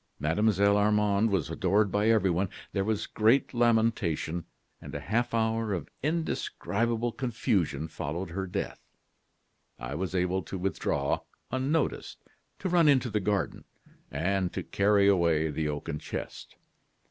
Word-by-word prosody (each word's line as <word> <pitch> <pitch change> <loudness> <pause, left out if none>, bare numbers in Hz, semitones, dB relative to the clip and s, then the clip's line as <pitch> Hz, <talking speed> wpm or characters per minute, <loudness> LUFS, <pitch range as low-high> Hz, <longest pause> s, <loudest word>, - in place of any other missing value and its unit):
Mademoiselle 100 +6 +3
Armande 105 +1 +3
was 95 -6 0
adored 105 0 +2
by 105 +3 +2
everyone; 95 -4 +2 0.2
there 95 - +1
was 110 0 -1
great 115 +7 +2
lamentation, 110 -9 +1 0.4
and - - -9
a - - -2
half 120 +4 -1
hour 110 -1 0
of 85 -6 -4
indescribable 120 -7 -1
confusion 100 - -1
followed 85 +4 -5
her 95 +2 -3
death. 90 - -4 1.0
I - - -6
was 90 +4 -3
able 90 +1 +1
to 90 +3 -6
withdraw, 80 -6 -1 0.3
unnoticed, 135 +5 -1 0.3
to - - -3
run 170 -3 +4
into 130 -4 +3
the 105 - +1
garden, 100 0 -1 0.5
and 95 +1 0
to - - -3
carry 100 0 +3
away 85 -5 +3
the 75 +1 -2
oaken 75 +1 -4
chest. - - -7
100 Hz, 135 wpm, -29 LUFS, 90-115 Hz, 1.0 s, run